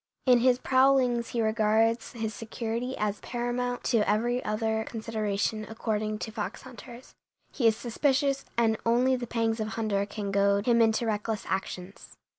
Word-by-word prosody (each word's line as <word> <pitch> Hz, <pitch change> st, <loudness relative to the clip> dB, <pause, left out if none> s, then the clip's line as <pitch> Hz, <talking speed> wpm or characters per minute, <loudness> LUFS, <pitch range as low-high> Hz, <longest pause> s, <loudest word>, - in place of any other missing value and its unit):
In 250 Hz, -2 st, +6 dB
his 250 Hz, 0 st, +4 dB
prowlings 260 Hz, -2 st, +3 dB
he 235 Hz, -2 st, -1 dB
regards 220 Hz, +1 st, +1 dB
his 220 Hz, -2 st, -3 dB
security 230 Hz, +3 st, -4 dB
as 210 Hz, -1 st, -1 dB
paramount 245 Hz, +1 st, -3 dB
to 240 Hz, -, +2 dB
every 240 Hz, +4 st, +1 dB
other 220 Hz, +1 st, -1 dB
consideration, 220 Hz, -1 st, -2 dB
according 215 Hz, -1 st, -2 dB
to 220 Hz, -, -6 dB
fox 215 Hz, -1 st, -5 dB
hunters. 250 Hz, -1 st, -12 dB, 0.4 s
He 240 Hz, -5 st, +2 dB
is 220 Hz, -1 st, +3 dB
suspicious, 275 Hz, +3 st, 0 dB
and 225 Hz, -2 st, +3 dB
only 245 Hz, +3 st, +3 dB
the 245 Hz, -1 st, -5 dB
pangs 225 Hz, -1 st, 0 dB
of 215 Hz, -, -1 dB
hunger 215 Hz, -3 st, -1 dB
can 205 Hz, -1 st, -4 dB
goad 200 Hz, +1 st, +2 dB
him 235 Hz, -1 st, +4 dB
into 225 Hz, +1 st, +2 dB
reckless 215 Hz, -1 st, -2 dB
actions. 190 Hz, 0 st, -5 dB
225 Hz, 155 wpm, -28 LUFS, 215-245 Hz, 0.4 s, In